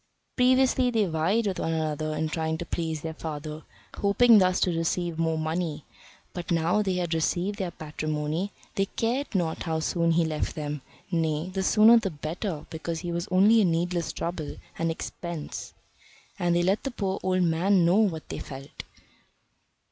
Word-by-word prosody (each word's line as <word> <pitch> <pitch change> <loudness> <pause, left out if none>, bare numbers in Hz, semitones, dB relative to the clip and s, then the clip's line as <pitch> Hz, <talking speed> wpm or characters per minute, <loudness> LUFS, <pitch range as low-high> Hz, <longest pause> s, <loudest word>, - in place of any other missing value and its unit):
Previously 255 0 +4
they 225 -4 +2
vied 175 +7 +1
with 195 -2 -1
one 165 - -1
another 155 -1 -1
in 155 +1 0
trying 160 0 -2
to 175 - -5
please 160 -3 -3
their 160 +1 -4
father, 155 -1 -6 0.4
hoping 215 +3 +6
thus 185 -1 +3
to 180 -2 +2
receive 165 0 -1
more 165 -1 +1
money, 155 -1 -2 0.5
but 175 -1 -6
now 170 +4 +2
they 195 -3 0
had 175 -2 -1
received 180 +5 0
their 185 -2 -1
patrimony, 155 +3 -3 0.2
they 195 -2 0
cared 240 +4 -2
not 170 -4 0
how 160 -2 -1
soon 170 +1 +1
he 165 0 +3
left 155 -1 -2
them 150 -2 -4 0.3
nay, 160 0 0
the 190 - -1
sooner 220 +4 +6
the 210 -4 -2
better, 160 +2 -4
because 160 0 -4
he 175 -1 -4
was 170 +1 -2
only 205 +5 +5
a - - +4
needless 170 0 0
trouble 165 -3 -4 0.2
and 165 0 +1
expense. 165 -1 -6 0.6
And 175 -1 +2
they 175 - +3
let 190 +4 +2
the 275 - -3
poor 195 -6 -2
old 185 -1 +1
man 175 +2 +3
know 175 +4 +4
what 190 -8 +1
they - - -4
felt. 135 0 -8
170 Hz, 175 wpm, -27 LUFS, 160-190 Hz, 0.6 s, hoping